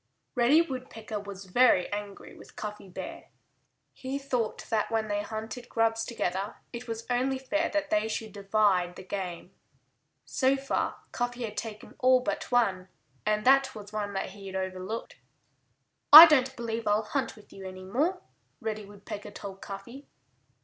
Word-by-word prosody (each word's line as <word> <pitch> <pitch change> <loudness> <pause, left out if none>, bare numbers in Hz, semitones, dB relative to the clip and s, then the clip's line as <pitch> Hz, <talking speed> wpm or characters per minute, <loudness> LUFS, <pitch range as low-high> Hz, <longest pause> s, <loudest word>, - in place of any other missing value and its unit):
* - - -50
Reddy 265 +7 +5
Woodpecker 250 -7 -6
was 200 -1 -9
very 190 -1 +4
angry 205 -1 -6
with - - -15
Cuffy 210 -2 -7
Bear. 180 - -7 0.7
He 265 +1 -4
thought 255 -5 -2
that 220 -2 +1
when 220 -1 -1
they 205 0 0
hunted 220 +3 -6
grubs 225 0 +1
together 195 -3 -2 0.2
it 240 +1 -7
was 230 0 -5
only 255 +2 +1
fair 305 +5 -1
that 300 -2 -1
they 215 +1 +2
should 220 -1 -4
divide 195 -3 +1
the 185 - -9
game. 185 -3 -5 0.7
So 265 0 +2
far 275 0 -2
Cuffy 245 0 -2
had 215 -2 -5
taken 215 -2 -6
all 255 0 +5
but 255 - -3
one. 195 -7 +2 0.4
And 215 0 +1
that 270 0 +5
was 210 -1 -10
one 205 -1 -3
that 195 - -3
he 200 0 -11
had 190 - -7
overlooked. 190 +3 -4 0.9
"I 310 +3 +15
don't 265 -5 +3
believe 230 -1 -4
I'll 210 +1 +3
hunt 270 +5 -2
with 210 -2 -17
you 195 - -10
any 185 0 -9
more," 300 - -1 0.4
Reddy 215 -1 -4
Woodpecker 205 0 -8
told 195 -1 -9
Cuffy. 220 +8 -9
220 Hz, 165 wpm, -29 LUFS, 200-255 Hz, 0.9 s, I